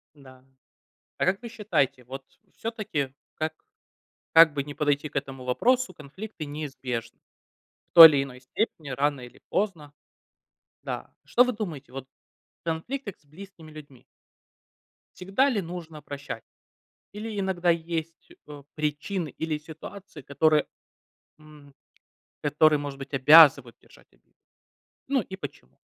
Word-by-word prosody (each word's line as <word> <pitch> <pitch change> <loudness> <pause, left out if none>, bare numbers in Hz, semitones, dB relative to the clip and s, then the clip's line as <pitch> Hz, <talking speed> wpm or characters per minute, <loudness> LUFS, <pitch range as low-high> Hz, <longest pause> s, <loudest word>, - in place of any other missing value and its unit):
Да. 130 -2 -17 0.7
А - - +1
как 195 +4 +1
вы 235 - -7
считаете, 140 - -1
вот 135 +2 -8 0.3
всё-таки, 205 - -4 0.2
как 155 0 -2 0.8
как 165 -2 +8
бы 140 -1 -2
ни 145 +1 -8
подойти 145 0 0
к - - -31
этому 135 -2 -4
вопросу, 250 - +1
конфликты 160 +4 -9
неизбежны. 135 -6 -5 0.7
В - - -73
той 165 -2 +13
или 140 -3 +1
иной 125 -2 -11
степени 150 - -3
рано 140 +1 0
или 125 -1 -13
поздно. 170 -8 -2 0.9
Да. - - -6
Что 245 - +5
вы 250 - -1
думаете 165 - -6
вот 135 -1 -7 0.6
о 170 - -2
конфликтах 200 +7 -4
с - - -33
близкими 165 +1 -13
людьми? 145 -5 -13 1.1
Всегда 195 +10 +1
ли 215 -6 0
нужно 165 -3 -8
прощать? 145 +1 -7 0.7
Или 210 0 -5
иногда 185 -3 0
есть, 165 -1 -4 0.2
э, 145 -1 -10
причины 155 +3 -2
или 155 +2 -3
ситуации, 160 +1 -11
которые, 150 +3 +2 0.7
м, 150 -2 -17 0.7
которые, 150 +1 +4
может 145 -1 -6
быть, 135 +1 -9
обязывают 140 -3 +7
держать - - -21
обиду? - - -34 0.7
Ну 270 -4 +2
и 190 - -9
почему? 70 - -10
155 Hz, 130 wpm, -26 LUFS, 140-185 Hz, 1.1 s, той